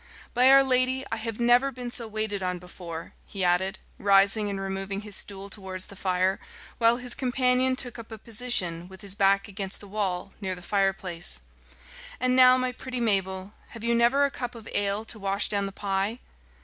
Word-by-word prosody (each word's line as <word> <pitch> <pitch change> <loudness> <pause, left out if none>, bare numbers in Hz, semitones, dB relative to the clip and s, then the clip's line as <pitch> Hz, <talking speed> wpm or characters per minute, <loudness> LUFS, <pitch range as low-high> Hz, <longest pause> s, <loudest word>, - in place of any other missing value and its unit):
"By 250 +2 +5
our 275 0 +8
Lady, 260 0 +2
I 225 - -1
have 225 0 -5
never 245 +3 +4
been 245 -1 -7
so 235 -2 -3
waited 215 -2 -2
on 180 -1 -1
before," 175 -2 -9
he 195 -2 -3
added, 180 +2 +2 0.2
rising 200 +1 +4
and 200 -1 -3
removing 195 +1 -3
his 210 -2 -4
stool 200 -1 -2
towards 190 -2 -6
the 200 - -12
fire, 185 0 0 0.4
while 230 0 +4
his 250 -1 +1
companion 255 0 +2
took 245 -2 -3
up 230 0 -10
a 220 - -6
position, 205 -7 0
with 190 +1 -13
his 200 -2 -5
back 195 0 +3
against 195 -1 -4
the 205 - -11
wall, 195 -2 -2
near 190 -2 -2
the 180 - -12
fireplace. 190 - 0 0.8
"And 255 0 +2
now, 255 0 +7
my 255 0 -1
pretty 255 0 -5
Mabel, 195 -3 0 0.2
have 225 - -10
you 235 0 +1
never 240 +5 +4
a 280 - -1
cup 245 -2 -5
of 225 -1 -11
ale 205 +2 0
to 220 0 -6
wash 195 +1 0
down 200 -1 0
the - - -6
pie?" 195 +2 -1
205 Hz, 195 wpm, -27 LUFS, 195-240 Hz, 0.8 s, our